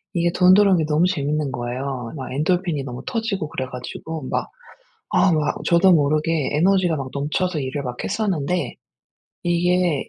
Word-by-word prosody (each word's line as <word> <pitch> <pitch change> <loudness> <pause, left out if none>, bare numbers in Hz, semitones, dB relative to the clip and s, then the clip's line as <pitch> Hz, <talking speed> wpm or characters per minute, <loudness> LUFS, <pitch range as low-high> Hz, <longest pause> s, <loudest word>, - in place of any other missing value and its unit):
이게 170 0 +2
돈 180 +1 +6
들어오는 200 -2 +5
게 160 - +1
너무 155 +3 +3
재밌는 150 -4 -1
거예요. 125 +1 -4
막 130 -4 -6
엔돌핀이 165 0 0
너무 125 -1 -6
터지고 225 -10 -2
그래 130 - -3
가지고. 130 +3 -7
막 - - -1 0.7
아 185 0 +4
막 155 -2 +1
저도 175 +2 +5
모르게 155 0 +1
에너지가 180 +2 +3
막 135 -2 -4
넘쳐서 155 +5 -1
일을 135 +2 -3
막 125 -1 -4
했었는데. 180 - -1 0.7
이게 175 -2 +1
160 Hz, 335 characters per minute, -22 LUFS, 140-180 Hz, 0.7 s, 돈